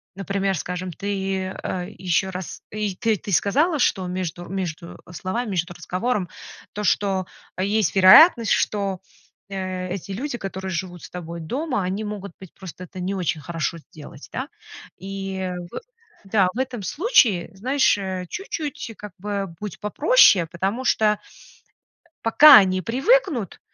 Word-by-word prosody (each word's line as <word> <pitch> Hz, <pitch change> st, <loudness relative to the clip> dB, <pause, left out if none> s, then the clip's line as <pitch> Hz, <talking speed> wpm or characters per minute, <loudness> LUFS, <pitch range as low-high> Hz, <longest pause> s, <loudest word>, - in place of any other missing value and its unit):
например, 195 Hz, 0 st, -1 dB
скажем, 180 Hz, +3 st, -4 dB
ты, 190 Hz, 0 st, -3 dB
э, 180 Hz, +1 st, -4 dB
ещё 190 Hz, +1 st, 0 dB
раз, 185 Hz, -1 st, -7 dB
э, 215 Hz, -, -7 dB
и 205 Hz, -3 st, -1 dB
т 225 Hz, +3 st, +1 dB
ты 200 Hz, +1 st, -7 dB
сказала, 295 Hz, -, +2 dB
что 190 Hz, -7 st, +1 dB
между 180 Hz, -1 st, -4 dB
между 175 Hz, -3 st, -5 dB
словами, 205 Hz, +6 st, -3 dB
между 175 Hz, -1 st, -2 dB
разговором 185 Hz, +4 st, -2 dB, 0.5 s
то, 210 Hz, -, -4 dB
что 195 Hz, -2 st, +1 dB, 0.3 s
есть 200 Hz, -2 st, +1 dB
вероятность, 225 Hz, -, +8 dB
что, 200 Hz, -3 st, 0 dB, 0.5 s
э, 185 Hz, -1 st, -4 dB
эти 195 Hz, +1 st, -6 dB
люди, 245 Hz, +5 st, -4 dB
которые 190 Hz, -2 st, -5 dB
живут 175 Hz, -1 st, -5 dB
с -, -, -9 dB
тобой 170 Hz, -1 st, -7 dB
дома, 250 Hz, -, -2 dB
они 190 Hz, +4 st, -2 dB
могут 205 Hz, -3 st, -6 dB
быть 190 Hz, -3 st, -13 dB
просто 185 Hz, -1 st, -10 dB
это 185 Hz, +2 st, -11 dB
не 185 Hz, +2 st, -2 dB
очень 175 Hz, -3 st, -1 dB
хорошо 165 Hz, 0 st, -3 dB
сделать, 150 Hz, -2 st, -13 dB
да? 265 Hz, +5 st, -4 dB, 0.5 s
И 195 Hz, -1 st, -4 dB, 0.2 s
в -, -, -5 dB, 0.5 s
да, 195 Hz, -2 st, +3 dB
в -, -, -9 dB
этом 255 Hz, -5 st, -3 dB
случае, 250 Hz, -, +3 dB
знаешь, 260 Hz, +3 st, +2 dB
э, 185 Hz, -2 st, -4 dB
чуть-чуть 305 Hz, -, -5 dB
как 210 Hz, -3 st, -9 dB
бы 200 Hz, -3 st, -4 dB
будь 210 Hz, -4 st, -6 dB
попроще, 210 Hz, -, +5 dB
потому 195 Hz, +8 st, -2 dB
что, 225 Hz, -3 st, +2 dB
э, 210 Hz, 0 st, +3 dB, 1.1 s
пока 285 Hz, +6 st, +9 dB
они 185 Hz, -2 st, +5 dB
привыкнут, 265 Hz, -, +1 dB
195 Hz, 150 wpm, -23 LUFS, 185-215 Hz, 1.1 s, пока